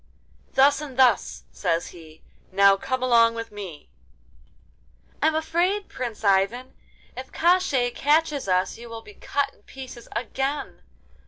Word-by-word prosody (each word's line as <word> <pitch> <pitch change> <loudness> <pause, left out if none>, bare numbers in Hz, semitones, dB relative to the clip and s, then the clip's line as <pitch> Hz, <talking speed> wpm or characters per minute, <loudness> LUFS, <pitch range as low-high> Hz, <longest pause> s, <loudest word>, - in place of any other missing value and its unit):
'Thus 280 +2 +4
and 275 -4 -8
thus,' 260 -2 +3
says 165 +1 -1
he. 160 -2 -15 0.3
'Now 195 +1 +6
come 260 +4 -3
along 230 -2 +4
with 230 -1 -6
me.' 190 -8 -9 1.3
'I - - +4
am 315 - +1
afraid, 350 +6 0
Prince 235 -4 -6
Ivan! 200 +6 +1 0.4
If 260 +1 -8
Koshchei 320 -9 +2
catches 295 -1 +1
us 185 +3 0
you 235 0 -10
will 230 0 -8
be 420 - -13
cut 285 - -2
in - - -27
pieces 250 0 -11
again. 270 +4 -3
255 Hz, 140 wpm, -24 LUFS, 205-285 Hz, 1.3 s, Now